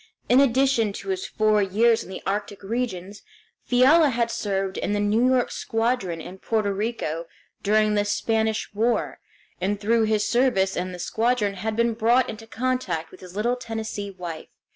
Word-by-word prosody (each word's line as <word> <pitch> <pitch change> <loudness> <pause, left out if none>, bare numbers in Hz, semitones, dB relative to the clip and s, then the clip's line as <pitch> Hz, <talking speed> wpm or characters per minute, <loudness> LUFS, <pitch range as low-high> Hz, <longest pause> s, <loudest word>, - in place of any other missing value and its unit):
In 250 - +6
addition 260 -5 +3
to 390 - -7
his 380 +1 -2
four 215 -1 +2
years 220 +4 +3
in - - -13
the 190 - -7
arctic 205 0 -3
regions, 200 -3 -4 0.5
Fiala 280 +6 +5
had 235 -2 0
served 195 -2 -2
in 205 - -1
the 205 - 0
New 215 +4 +2
York 255 -1 +2
Squadron 225 -7 -1
in 185 +4 -9
Porto 215 -1 0
Rico 195 -6 -3 0.3
during 215 +1 +3
the 205 -1 +2
Spanish 220 +1 -1
War, 230 +3 0 0.4
and 200 +2 0
through 225 +2 +2
his 215 -1 +1
service 235 -7 +2
in 185 +1 -3
the 180 - -7
squadron 220 +2 0
had 215 +3 -3
been 235 0 +2
brought 235 +3 +2
into 225 +1 -11
contact 225 -10 -2
with - - -14
his 180 0 -12
little 235 +4 +1
Tennessee 225 -4 -5
wife. 175 -4 -7
215 Hz, 170 wpm, -24 LUFS, 195-235 Hz, 0.5 s, In